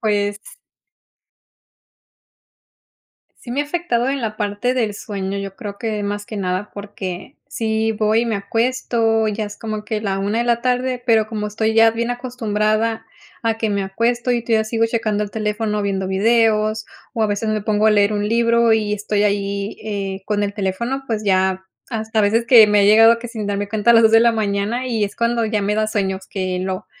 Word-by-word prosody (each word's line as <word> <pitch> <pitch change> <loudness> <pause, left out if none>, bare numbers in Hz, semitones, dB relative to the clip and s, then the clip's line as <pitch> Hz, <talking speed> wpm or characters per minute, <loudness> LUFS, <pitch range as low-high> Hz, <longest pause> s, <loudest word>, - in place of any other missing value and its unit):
Pues 205 -1 0 3.0
Sí 240 - -11
me 270 +4 0
ha - - -1
afectado 290 -6 -1
en 275 -1 -2
la 215 -1 -3
parte 210 +4 -1
del 225 -5 -1
sueño, 200 -2 -5
yo 195 -1 -6
creo 200 0 -7
que 215 -2 -3
más 205 0 -3
que 215 - -8
nada 185 +1 -2
porque 200 - -7
sí 220 -4 -1
voy, 220 +2 +1
me 225 -3 -1
acuesto, 225 +1 0
ya 215 +1 -2
es 205 0 -9
como 215 -1 -5
que 215 0 -3
la 195 -2 -2
1:00 205 +3 -1
de 235 - +1
la 235 -1 +1
tarde, 250 0 -1
pero 220 -3 +3
como 215 -1 -4
estoy 220 +1 -1
ya 225 0 +6
bien 235 +2 -2
acostumbrada 225 -2 -1 0.4
a 225 -1 0
que 220 -1 0
me 200 -1 0
acuesto 235 +6 -1
y 240 -1 +1
todavía 225 -2 +1
sigo 225 +1 0
checando 220 -2 -1
el 205 - -5
teléfono 210 -1 -2
viendo 195 -1 -2
videos 215 +1 +2 0.3
o 230 - -1
a - - +3
veces 210 +1 -2
me 215 0 0
pongo 210 +1 +1
a - - +6
leer 205 0 +3
un 205 0 -1
libro 235 +1 +3
y 210 -1 +1
estoy 210 0 -1
ahí, 200 0 -1
eh, 195 -2 -4
con 205 -1 -1
el 200 0 -2
teléfono, 235 +7 -2
pues 220 -2 -2
ya 190 -1 +1 0.2
hasta 220 -1 -1
a - - +2
veces 225 +3 +2
que 230 -3 +8
me 210 -1 +3
he 200 - +4
llegado 225 +2 +6
que 240 - -8
sin 220 -3 -5
darme 205 0 -2
cuenta 215 +1 +2
a - - +8
las 230 - +6
2:00 220 - +5
de 225 - +7
la 235 0 +4
mañana 215 +3 -1
y 225 -4 0
es 200 - -6
cuando 235 0 +1
ya 215 -1 -1
me 205 +1 0
da 215 0 +1
sueño 200 -3 -1
es 190 - -13
que 185 -2 -3
lo 185 +1 -4
215 Hz, 205 wpm, -20 LUFS, 205-230 Hz, 3.0 s, que